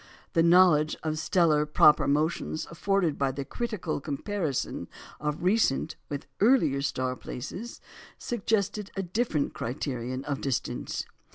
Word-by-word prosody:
The 165 - +4
knowledge 170 -3 +5
of 155 -1 -1
stellar 160 -3 +3
proper 150 0 +5
motions 155 +2 0
afforded 175 -2 0
by 135 -1 +2
the 135 +1 -5
critical 205 - -3
comparison 155 - -3 0.3
of 150 +2 -3
recent 180 -6 +2
with 145 -1 -4
earlier 190 - +4
star 130 -2 -1
places, 185 - -7 0.4
suggested 210 -3 -1
a 195 - -1
different 180 -5 -1
criterion 130 0 -4
of 145 -2 -3
distance. 135 -3 -2
155 Hz, 120 wpm, -28 LUFS, 140-195 Hz, 0.4 s, knowledge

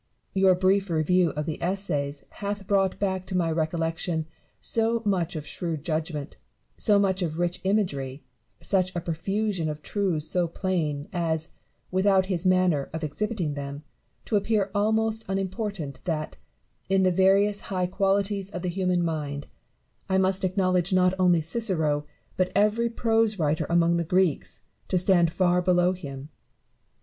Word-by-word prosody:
Your 190 -1 +5
brief 190 +1 +2
review 170 +2 +2
of 150 0 -3
the 155 0 -4
Essays 150 -6 -2
hath 205 -1 -4
brought 195 -1 +1
back 190 -2 -1
to 185 - -1
my 165 -2 +1
recollection 165 +1 -1 0.3
so 230 0 0
much 180 -3 0
of 150 -1 -5
shrewd 160 0 -4
judgment, 155 -2 -3 0.4
so 210 -2 +3
much 195 -1 +1
of 160 -3 -2
rich 175 +1 -1
imagery, 150 -10 -1 0.4
such 185 -1 +1
a - - 0
profusion 175 +1 -1
of 150 0 -6
truths 185 -7 -1
so 175 +1 +1
plain, 160 -5 -2
as 165 -2 -1 0.4
(without 190 0 +3
his 185 -1 -1
manner 185 -6 +2
of 160 0 -4
exhibiting 175 +1 -2
them) 140 +1 -6 0.4
to 220 - -1
appear 205 -1 0
almost 220 +2 +1
unimportant 195 - -3
that, 155 -3 -2 0.5
in 190 0 +3
the 185 - +4
various 195 +3 +3
high 185 -2 0
qualities 195 +1 0
of 180 -2 -6
the 180 - -1
human 180 -1 0
mind, 145 -3 -3 0.6
I 190 - +3
must 190 0 +2
acknowledge 185 -1 +1
not 180 0 +4
only 175 -3 +4
Cicero, 160 -6 -1 0.3
but 185 -1 +1
every 215 +3 +3
prose 225 -2 +2
writer 155 -2 0
among 170 0 +3
the 170 - 0
Greeks, 180 -2 0 0.3
to 185 - +1
stand 175 -2 +4
far 180 0 +2
below 180 0 +3
him. 140 -5 -8
180 Hz, 150 wpm, -26 LUFS, 160-195 Hz, 0.6 s, Your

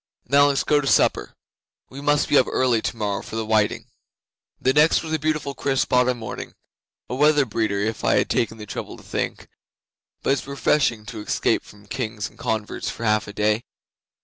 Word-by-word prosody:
Now 140 +1 +5
let's 140 -1 +1
go 150 -1 +3
to 140 - -4
supper. - - +2 0.6
We 135 +2 -8
must 145 0 +2
be - - +2
up 130 - +2
early 125 -4 +2
tomorrow 105 -4 -2
for - - -9
the 110 0 -2
whiting." 110 -1 +1 0.7
'The 130 - +2
next 150 +4 +4
was 160 -1 -4
a 160 - +1
beautiful 155 -2 -1
crisp 135 0 -1
autumn 125 0 +3
morning 110 -2 -7 0.5
a - - -5
weather 150 +1 +4
breeder, 110 -3 -1
if 110 +1 -2
I - - +3
had - - +2
taken 115 -1 0
the 105 - -8
trouble - - -6
to - - -15
think; - - -4 0.8
but 135 - +3
it's 140 - -3
refreshing 140 -5 +1
to 110 - -7
escape - - 0
from 105 0 -17
kings 110 -3 -4
and - - -24
converts 110 -1 -2
for 115 - -7
half 105 -2 +1
a 105 - -8
day. 105 +2 +1
120 Hz, 195 wpm, -23 LUFS, 110-140 Hz, 0.8 s, Now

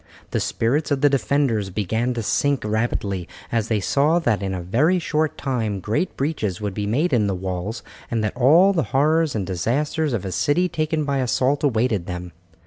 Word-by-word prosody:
The - - 0
spirits 140 +8 0
of 140 -2 0
the 145 -1 +4
defenders 135 -7 +1
began 110 +6 -1
to 115 - -2
sink 140 +5 +1
rapidly, 105 -4 -1 0.2
as 115 -2 0
they 110 -2 +1
saw 145 - +2
that 120 -12 +1
in 95 -1 -2
a 95 - -3
very 145 - +2
short 155 -2 -1
time 115 -7 -2
great 110 - -2
breaches 120 - -2
would 105 -2 -3
be 105 +1 -3
made 145 +9 +1
in 110 -4 +3
the 95 - -1
walls, 95 +4 -4 0.3
and 115 -2 -1
that 105 - -2
all 160 +11 +5
the 170 - +1 0.2
horrors 155 +1 +2
and 100 -3 -1
disasters 135 - -1
of 105 -5 -2
a 95 - -3
city 155 - +1
taken 155 -2 -1
by 140 -1 0
assault 130 +3 +1
awaited 115 -8 +1
them. 90 0 -5
120 Hz, 195 wpm, -22 LUFS, 105-145 Hz, 0.3 s, all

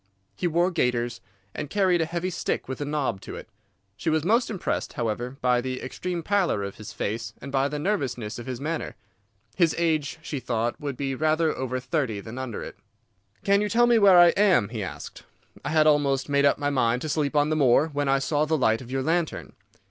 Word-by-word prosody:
He 180 - -1
wore 175 +2 +2
gaiters, 120 -6 -1 0.3
and 145 - -5
carried 185 -4 +2
a 160 - 0
heavy 175 +2 -2
stick - - -2
with 130 +2 -5
a - - -1
knob 145 -9 -2
to - - -8
it. - - -9 0.5
She 160 - -2
was 155 -1 +1
most 230 +7 +2
impressed, 200 -5 -3
however, 120 +1 -3
by 125 -1 +3
the 130 0 -4
extreme 175 +6 -4
pallor 185 - +1
of 100 0 -6
his 110 0 -9
face 110 +3 -4
and 140 - -8
by 135 0 +2
the 150 +1 -4
nervousness 135 - -2
of 120 - -9
his 130 -2 -4
manner. 160 +3 -3 0.6
His 170 -4 +3
age, 160 -3 0
she 145 - -4
thought, 120 -1 -2
would 140 -3 -4
be 135 -1 -2
rather 155 +3 +1
over 130 -1 -3
thirty 130 -6 -2
than 110 +5 -8
under 130 -4 -5
it. - - -9 0.7
"'Can 200 0 +3
you 210 - 0
tell 240 +2 +4
me 240 -1 +4
where 195 -3 +7
I 175 0 +8
am?' 185 - +3
he 115 -2 -5
asked. 95 - -7 0.4
'I - - -3
had 155 0 +4
almost 145 -2 +2
made 140 0 +3
up 140 - +4
my 145 -1 -1
mind 125 -2 +1
to - - -3
sleep 145 -1 -1
on 145 0 +3
the 155 - +1
moor, 145 +2 +4
when 145 -1 -2
I 135 - +4
saw 145 +2 0
the 160 +1 +1
light 115 -4 +2
of 125 - -11
your 135 0 -1
lantern. 165 +1 -1
145 Hz, 220 wpm, -25 LUFS, 125-165 Hz, 0.7 s, I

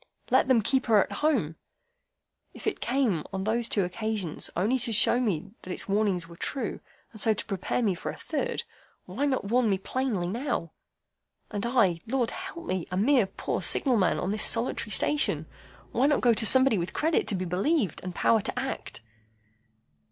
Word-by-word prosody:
Let - - +4
them 245 -5 +3
keep 265 +4 0
her 220 -3 +5
at - - -12
home'? 240 - +1 1.0
If - - -11
it - - -1
came, 240 - 0
on 190 -1 -3
those 230 +3 0
two 200 - +2
occasions, 200 -2 -3
only 220 +9 +1
to 235 -1 +1
show 230 +2 +4
me 200 -6 -2
that - - -12
its - - -3
warnings 195 -4 0
were 170 - -13
true, 270 - -4 0.3
and 215 - -5
so 220 0 +3
to - - -5
prepare 195 +4 -2
me 205 -4 +2
for 175 - -5
the - - -11
third, 485 -1 -3 0.4
why 285 - -2
not 260 -6 -1
warn 245 -2 +3
me 195 - +2
plainly 220 -2 -2
now? 230 - -3 0.8
And 210 +1 -3
I, 200 -9 +2
Lord 245 -1 0
help 365 -2 -8
me! 185 - -3
A 185 - -3
mere 240 +1 +3
poor 190 - -4
signal 260 -4 +3
man 185 -4 +2
on 185 - -2
this 215 +1 +1
solitary 230 -1 +2
station! 295 +7 +1 0.5
Why 265 - +2
not 290 - +2
go 240 -2 +4
to 220 0 +4
somebody 260 -4 +6
with 170 - -4
credit 320 +1 0
to 205 - 0
be 185 0 -3
believed, 195 - 0
and 180 -1 -6
power 225 -2 +3
to 200 - -3
act?" 265 - -5
220 Hz, 190 wpm, -27 LUFS, 190-260 Hz, 1.0 s, somebody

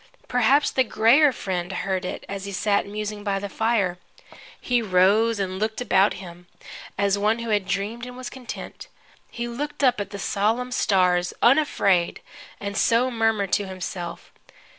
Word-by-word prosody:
Perhaps 250 +4 +3
the 260 - +2
grayer 255 +6 +4
friend 185 -6 -4
heard 190 -1 -2
it, - - -5
as 200 0 -5
he 200 - -5
sat 200 +1 0
musing 210 0 -5
by 200 -2 0
the 200 +1 -4
fire. 200 -4 0 0.6
He 245 -1 +1
rose 205 +3 +3
and 190 -1 -3
looked 220 +1 -2
about 205 -4 +3
him, 175 -1 -11 0.5
as 200 0 +1
one 215 +2 +2
who 235 -1 -4
had 205 -3 +1
dreamed 210 +5 -3
and 250 0 -10
was 255 -1 -6
content. 255 -2 -8 0.4
He 235 0 -5
looked 285 +5 -5
up 250 -5 +3
at 205 - -5
the 200 - -7
solemn 225 +6 -1
stars 180 -6 +2
unafraid, 200 - +3 0.4
and 200 0 -5
so 235 +4 +2
murmured 225 -4 0
to 205 - +1
himself. 185 -2 -6
205 Hz, 160 wpm, -24 LUFS, 190-235 Hz, 0.6 s, grayer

